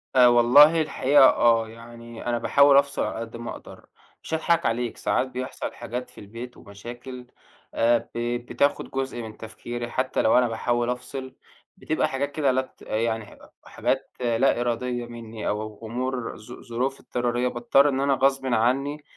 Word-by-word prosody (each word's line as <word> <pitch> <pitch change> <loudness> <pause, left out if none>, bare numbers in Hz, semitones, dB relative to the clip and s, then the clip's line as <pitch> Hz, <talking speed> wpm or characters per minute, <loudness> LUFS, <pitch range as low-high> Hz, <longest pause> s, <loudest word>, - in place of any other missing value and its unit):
آآ، 125 -1 +7
والله 125 +7 +6
الحقيقة 145 -2 +3
آه، 115 -1 +3
يعني 115 0 -11
أنا 120 0 0
باحاول 140 +3 +5
أفصل 140 0 +2
على - - -3
قد 115 0 -7
ما 120 0 -6
أقدر، - - -12 0.4
مش - - -7
هاضحك 165 +1 +1
عليك 120 +1 -1
ساعات 130 - 0
بيحصل 130 0 -5
حاجات 120 +1 -6
في - - -21
البيت 115 +4 -9
ومشاكل 120 +5 -10 0.5
آآ، 120 +1 +3 0.2
ب - - -2 0.3
بتاخد 140 +3 0
جزء 135 -2 -3
من 110 -1 -9
تفكيري 120 +2 -7
حتّى 130 0 0
لو 110 - +4
أنا 125 -1 +4
باحاول 120 +1 -1
أفصل 130 +1 -6 0.4
بتبقى - - 0
حاجات 140 +2 -3
كده 145 -2 +1
لا 130 +1 +1 0.2
ت - - -17
آآ، - - -4
يعني 110 0 -1
ح - - -16
أ - - -17 0.2
حاجات - - -2
لا 120 +1 +2
إرادية 120 0 -2
مِنّي 115 -2 -8
أو 110 +1 -4
أمور 125 +1 -3
ظ 110 +3 -14
ظروف 125 +3 -3
اضطرارية، 120 0 -1
باضطر 125 +4 +3
إن 135 -1 -1
أنا 140 0 +2
غصبٍ 135 0 +1
عنّي 135 +5 0
120 Hz, 170 wpm, -25 LUFS, 115-135 Hz, 0.5 s, آآ